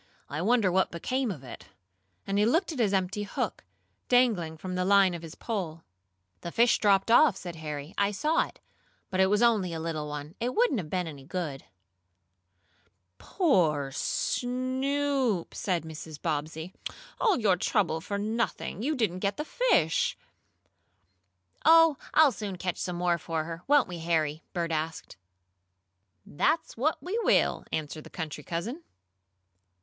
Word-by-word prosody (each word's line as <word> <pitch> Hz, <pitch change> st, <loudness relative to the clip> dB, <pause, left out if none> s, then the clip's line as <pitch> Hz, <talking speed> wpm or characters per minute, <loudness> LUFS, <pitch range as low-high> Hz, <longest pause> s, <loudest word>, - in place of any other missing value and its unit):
"I 150 Hz, +3 st, -2 dB
wonder 215 Hz, -1 st, +3 dB
what 190 Hz, +1 st, +2 dB
became 255 Hz, +9 st, -2 dB
of 155 Hz, -10 st, -6 dB
it?" 130 Hz, -, -10 dB, 0.6 s
and 195 Hz, +1 st, 0 dB
he 210 Hz, -, +4 dB
looked 335 Hz, +9 st, +2 dB
at 295 Hz, -, -6 dB
his 215 Hz, -4 st, +3 dB
empty 195 Hz, +1 st, 0 dB
hook, 205 Hz, -, -3 dB, 0.5 s
dangling 215 Hz, -11 st, +3 dB
from 185 Hz, +3 st, -6 dB
the 180 Hz, 0 st, 0 dB
line 195 Hz, -1 st, +5 dB
of 170 Hz, -, -5 dB
his 165 Hz, -1 st, -9 dB
pole. 175 Hz, -8 st, -4 dB, 0.6 s
"The 170 Hz, -, -6 dB
fish 235 Hz, +4 st, +4 dB
dropped 200 Hz, +1 st, +3 dB
off," 240 Hz, -3 st, +6 dB
said 175 Hz, -2 st, -7 dB
Harry. 150 Hz, 0 st, -6 dB
"I 200 Hz, 0 st, +3 dB
saw 300 Hz, +11 st, +1 dB
it. -, -, -18 dB, 0.5 s
But 185 Hz, -, -1 dB
it 190 Hz, -, +5 dB
was 210 Hz, +4 st, +2 dB
only 210 Hz, -7 st, +3 dB
a 165 Hz, -, -4 dB
little 160 Hz, -2 st, -3 dB
one. 150 Hz, +1 st, -6 dB
It 245 Hz, +2 st, -2 dB
wouldn't 450 Hz, -, +3 dB
have 160 Hz, -5 st, -6 dB
been 180 Hz, 0 st, -1 dB
any 145 Hz, -4 st, -8 dB
good." 155 Hz, -3 st, -5 dB, 1.5 s
"Poor 160 Hz, -, +1 dB
Snoop!" 255 Hz, -, -1 dB
said 180 Hz, -4 st, -1 dB
Mrs. 160 Hz, -1 st, -8 dB
Bobbsey. 160 Hz, +2 st, -3 dB, 0.5 s
"All 435 Hz, -5 st, +3 dB
your 205 Hz, -5 st, +3 dB
trouble 170 Hz, -3 st, 0 dB
for 200 Hz, +4 st, -3 dB
nothing! 220 Hz, 0 st, -2 dB
You 300 Hz, +6 st, 0 dB
didn't 210 Hz, -8 st, 0 dB
get 200 Hz, +1 st, -1 dB
the 300 Hz, -, -3 dB
fish." 310 Hz, -, +2 dB, 1.5 s
"Oh, 330 Hz, -2 st, +7 dB, 0.2 s
I'll 310 Hz, -3 st, +7 dB
soon 205 Hz, -4 st, -5 dB
catch 180 Hz, -1 st, -3 dB
some 180 Hz, -, -3 dB
more 175 Hz, -1 st, +1 dB
for 160 Hz, -1 st, -2 dB
her, 165 Hz, +1 st, -7 dB
won't 290 Hz, -1 st, +5 dB
we, 175 Hz, -2 st, -6 dB
Harry?" 160 Hz, -2 st, 0 dB
Bert 170 Hz, -2 st, -2 dB
asked. 160 Hz, -4 st, -4 dB, 1.1 s
"That's 315 Hz, -, 0 dB
what 290 Hz, +7 st, +1 dB
we 390 Hz, +6 st, -2 dB
will," -, -, +2 dB
answered 155 Hz, 0 st, -4 dB
the -, -, -12 dB
country 155 Hz, -3 st, -6 dB
cousin. 200 Hz, -, -4 dB
185 Hz, 155 wpm, -28 LUFS, 160-240 Hz, 1.5 s, Oh